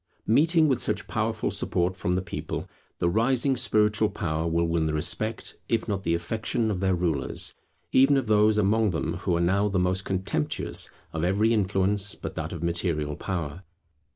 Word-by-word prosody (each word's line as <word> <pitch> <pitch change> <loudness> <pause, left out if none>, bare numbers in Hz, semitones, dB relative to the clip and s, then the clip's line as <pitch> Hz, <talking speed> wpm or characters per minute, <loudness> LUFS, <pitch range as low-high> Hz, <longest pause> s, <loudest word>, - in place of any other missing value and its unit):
Meeting 160 +7 +4
with 135 -4 +1
such - - -2
powerful - - -1
support 90 +1 -1
from 90 -1 -1
the 90 0 0
people, - - -5 0.3
the 85 - 0
rising 120 +7 +3
spiritual 110 -3 +2
power 80 -5 -2
will 85 +1 +1
win 85 -1 0
the 75 - -1
respect 110 +8 -2
if 115 0 0
not 100 -3 -2
the 85 -3 0
affection 110 +5 -1
of 95 - -2
their 95 -1 +1
rulers, 85 -6 0 0.4
even 135 +2 +5
of 135 - 0
those 105 0 +3
among 105 +1 +3
them 80 -1 -2
who 90 -1 -1
are - - 0
now 95 +4 +2
the 100 - -1
most 90 +1 +1
contemptuous 95 -6 -1 0.2
of 80 0 -2
every 105 +6 +2
influence 100 0 +1
but - - -7
that 80 +1 -4
of 85 -2 -6
material 85 -3 -1
power. 85 -2 -4
95 Hz, 180 wpm, -26 LUFS, 85-110 Hz, 0.4 s, even